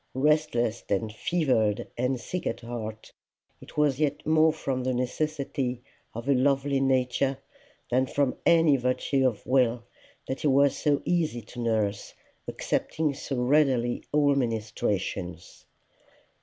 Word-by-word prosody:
Restless 135 -5 +1
and 105 +2 -1
fevered 115 -7 0
and 125 +1 -1
sick 180 +7 -4
at - - -3
heart, 110 -2 -7 0.5
it - - -14
was 145 -3 +2
yet 150 -2 -1
more 155 0 +4
from 135 -5 -3
the 130 0 0
necessity 130 -1 -2 0.3
of 115 +3 -6
a 140 - +4
lovely 135 +1 +2
nature 130 0 +1 0.5
than 130 +2 +2
from 140 -1 0
any 165 -4 +5
virtue 130 +1 +1
of 115 -5 -4
will 125 -2 +2 0.4
that 130 - -4
he - - +1
was 140 0 +4
so 145 -1 +1
easy 160 -9 0
to 120 - -11
nurse, 110 -3 -1 0.3
accepting 155 -2 -1
so 135 0 -5
readily 130 -3 +2
all 145 -1 +4
ministrations. 105 -7 -3
130 Hz, 130 wpm, -27 LUFS, 120-145 Hz, 0.5 s, any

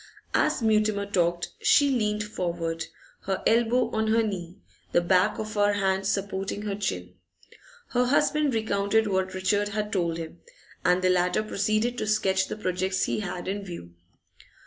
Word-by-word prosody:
As - - +1
Mutimer 215 -2 +2
talked 175 -3 0
she 415 -10 +5
leaned 210 -4 0
forward, 170 -5 -3 0.4
her 190 -1 -2
elbow 235 +2 +3
on 220 0 0
her 225 +1 +3
knee, 180 -5 -4 0.4
the - - +5
back 180 +3 +2
of 215 0 -5
her 205 0 +3
hand 195 -1 0
supporting 195 +1 -2
her 205 -1 -2
chin. 90 - -3 0.8
Her 250 0 +2
husband 285 +1 +2
recounted 220 0 +1
what 190 -2 -1
Richard 205 +2 +1
had 210 0 -3
told 170 -4 0
him, 165 -1 -7 0.4
and 180 +1 +3
the 185 - +4
latter 180 +3 +2
proceeded 215 +4 0
to 215 - -2
sketch 190 -3 +2
the - - -5
projects 185 -1 -1
he - - 0
had 180 -3 -5
in 200 +1 -3
view. 170 - -9
200 Hz, 160 wpm, -26 LUFS, 185-215 Hz, 0.8 s, she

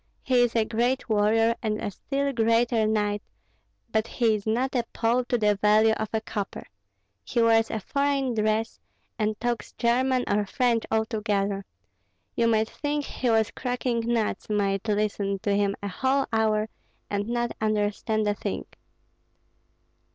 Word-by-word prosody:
He 255 -2 +3
is 240 -1 +1
a 225 -1 +3
great 240 +4 0
warrior 225 +2 +3
and 215 -1 -1
a 205 - -3
still 280 +6 -2
greater 230 -1 +2
knight, 210 -1 0 0.7
but 220 +1 +1
he 230 -3 +1
is 210 0 -3
not 245 +5 0
a 245 -3 +1
Pole 240 +2 +1
to 245 - +1
the 210 -2 +2
value 215 +2 +4
of 220 -1 -3
a 220 - 0
copper. 205 -2 -5 0.6
He 235 - -2
wears 225 -1 +4
a 220 - -2
foreign 280 +3 0
dress, 215 +1 0 0.4
and 215 0 0
talks 240 -1 -2
German 255 +2 +1
or 205 0 +1
French 240 0 +1
altogether; 205 -3 -1 0.7
you 230 - +2
might 220 -1 +2
think 290 -1 -2
he 250 - -2
was 225 -1 +2
cracking 250 -1 -2
nuts, 230 -2 -1
might 200 -1 0
listen 205 -1 0
to 205 - +1
him 200 -1 +1
a - - -1
whole 265 +7 +1
hour, 215 -1 +2 0.4
and 205 +2 -2
not 240 0 -1
understand 215 0 0
a 205 - +2
thing." - - -4
220 Hz, 155 wpm, -26 LUFS, 210-240 Hz, 0.7 s, value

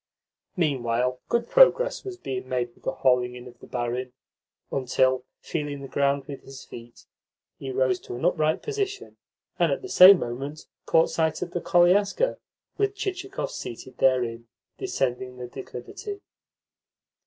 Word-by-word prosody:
Meanwhile 125 -5 0
good 235 0 +1
progress - - +5
was 385 -2 -6
being 130 - -5
made 120 -2 -1
with - - -26
the - - +1
hauling 125 -2 +2
in 125 0 -10
of 120 -1 -14
the - - -13
barin; 125 +1 -3 0.6
until, 130 -1 +1 0.2
feeling 145 -3 -4
the - - -6
ground 140 0 +1
with 140 -2 -8
his 135 0 -11
feet, 120 0 -12 0.5
he 135 - -6
rose 130 -1 +1
to - - -8
an 125 - -4
upright 155 -3 +1
position, 405 -2 -4 0.4
and - - +3
at - - -2
the 385 - -7
same 190 - +9
moment 135 +3 -5 0.2
caught 160 - +4
sight 160 -1 0
of 175 - -7
the 175 - -3
koliaska, 195 - +3 0.4
with 405 -1 +1
Chichikov 385 -1 -4
seated 120 +2 -8
therein, 120 -3 +1 0.3
descending 130 - -2
the 125 - -6
declivity. 135 - -8
135 Hz, 150 wpm, -26 LUFS, 125-190 Hz, 0.6 s, same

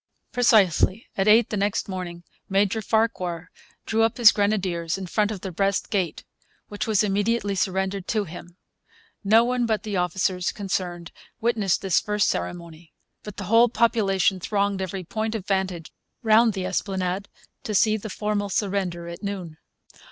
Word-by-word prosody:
Precisely 220 -3 +3
at 195 +1 0
eight 220 +2 +5
the - - -1
next 200 0 0
morning 180 -3 -6 0.3
Major 200 +2 +1
Farquhar 185 -6 -1 0.3
drew 225 0 +1
up 225 0 +2
his 235 -3 +8
grenadiers 190 -5 -1
in 190 - -5
front 210 +3 0
of 205 -4 -5
the 190 - -5
West 195 +3 -1
Gate, 185 -6 -1 0.5
which 205 +1 -4
was 215 -2 +3
immediately 205 +1 0
surrendered 190 0 -1
to 215 -2 0
him. 175 0 -11 0.7
No 220 +3 +5
one 245 0 0
but 220 -2 0
the 210 -3 -3
officers 180 +1 0
concerned 180 -4 -4 0.3
witnessed 220 -6 0
this 190 -3 +3
first 210 -1 0
ceremony. 170 -1 -5 0.3
But 210 -2 -10
the 205 - -5
whole 230 +5 +5
population 200 -5 +2
thronged 200 +1 -1
every 190 0 -4
point 220 +5 -3
of 205 -4 -5
vantage 190 -4 -2 0.3
round 225 0 +5
the 190 -2 -3
Esplanade 190 0 -2 0.3
to 215 - -4
see 215 +2 +4
the 220 0 -6
formal 205 0 -2
surrender 185 -3 -2
at 170 0 -8
noon. 185 -6 -6
200 Hz, 160 wpm, -24 LUFS, 185-215 Hz, 0.7 s, his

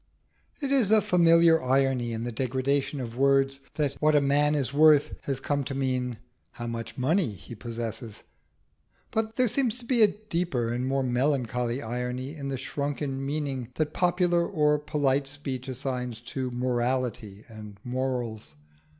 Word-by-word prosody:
It 275 - -1
is 260 -8 +4
a 220 0 +6
familiar 170 -4 +5
example 145 - -8
of - - 0
irony 135 -3 +2
in 115 0 -3
the 120 - -3
degradation 135 +4 -1
of 120 -2 -5
words 135 +1 +3 0.2
that 145 -3 0
"what 155 0 +4
a - - +7
man 145 +2 +3
is 140 -2 -1
worth" 150 0 +5
has 135 -2 -1
come 145 +1 -1
to 135 - -4
mean 130 -3 -1 0.4
how 120 - -6
much 115 0 -5
money 155 - +2
he 100 - -11
possesses; 115 0 -6 0.9
but 220 0 -1
there 255 -1 +3
seems 245 0 0
a 230 -4 +7
deeper 175 - -2
and 125 +2 -2
more 135 0 +1
melancholy 125 -1 0
irony 125 +3 -3
in 140 -3 -6
the 135 -1 -2
shrunken 140 0 -3
meaning 140 -3 -3
that 155 -1 -1
popular 175 -1 +2
or 150 -5 +2
polite 145 -2 0
speech 135 -2 -6
assigns 125 -2 -3
to 130 +1 -4
"morality" 120 -4 -2
and 105 -3 -10
"morals." 125 - -3
135 Hz, 160 wpm, -27 LUFS, 125-150 Hz, 0.9 s, a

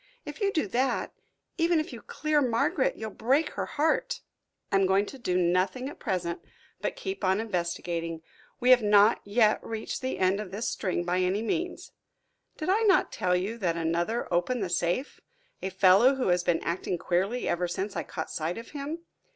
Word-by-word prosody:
If - - -8
you 400 -1 +2
do 315 - 0
that, 255 +5 0 0.5
even 335 0 +3
if 310 - -4
you 235 - -8
clear 305 -1 0
Margaret, 255 - +1
you'll 220 -1 -6
break 275 +10 +1
her - - -4
heart." 310 +2 0 0.5
"I 195 - +4
am 195 -1 +3
going 195 +2 +3
to 270 - -10
do 180 -6 0
nothing 185 +9 +1
at - - -11
present 175 -3 -2 0.4
but - - -2
keep 390 - -5
on 190 +1 +2
investigating. 170 -5 -3 0.4
We 250 +1 +4
have 250 -1 +7
not 210 +1 +5
yet 215 +1 +3
reached 225 +3 -4
the 260 0 -2
end 190 +2 +2
of 210 -3 -5
this 205 +5 -3
string 180 -3 -1
by 180 +1 0
any 185 +4 +1
means. 345 +10 -3 0.7
Did 310 - -4
I 405 +4 +3
not 385 - +4
tell 180 -1 +1
you 200 +6 -2
that 170 -5 0
another 170 +8 -1
opened 210 +7 +1
the 185 - -3
safe? 175 +9 -1 0.4
a 190 - -2
fellow 195 +8 +5
who 260 -7 0
has 175 0 +2
been 170 -2 +1
acting 175 +1 -2
queerly 190 +9 -1
ever 175 +1 0
since 190 +3 -4
I - - -1
caught 160 - -6
sight 160 +2 -2
of 230 - -9
him? 300 +3 -5
205 Hz, 190 wpm, -28 LUFS, 180-255 Hz, 0.7 s, have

